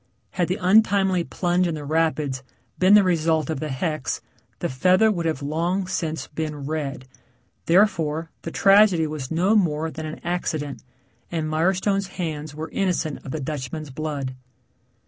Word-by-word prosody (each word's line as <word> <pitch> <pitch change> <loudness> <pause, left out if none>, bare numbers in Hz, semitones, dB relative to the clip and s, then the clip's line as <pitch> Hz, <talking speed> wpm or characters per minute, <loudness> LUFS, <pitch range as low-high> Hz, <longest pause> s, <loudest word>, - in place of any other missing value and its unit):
Had 175 -2 0
the 185 - -1
untimely 195 -2 +4
plunge 175 +1 0
in 165 - -2
the 150 -1 -6
rapids 155 -3 0 0.4
been 185 +3 +6
the 210 - +7
result 160 -4 +1
of 155 - -3
the 155 - -3
hex 155 0 -2 0.4
the - - -2
feather 185 +11 +3
would 170 -4 -1
have 155 -3 -2
long 170 +6 0
since 165 -4 -3
been 150 -2 -4
red, 145 -3 -3 0.6
therefore, 165 -4 +2
the - - -5
tragedy 195 -2 +5
was 150 -4 -5
no 180 +6 +2
more 160 -5 +1
than 155 0 -6
an 155 - -7
accident 155 -5 -2 0.5
and 160 -2 -1
Mirestone's 190 +5 +1
hands 155 -4 -4
were 155 0 -6
innocent 180 -6 -1
of - - -8
the 155 - -3
Dutchman's 145 +1 -5
blood. 140 -2 -4
160 Hz, 155 wpm, -24 LUFS, 150-185 Hz, 0.6 s, the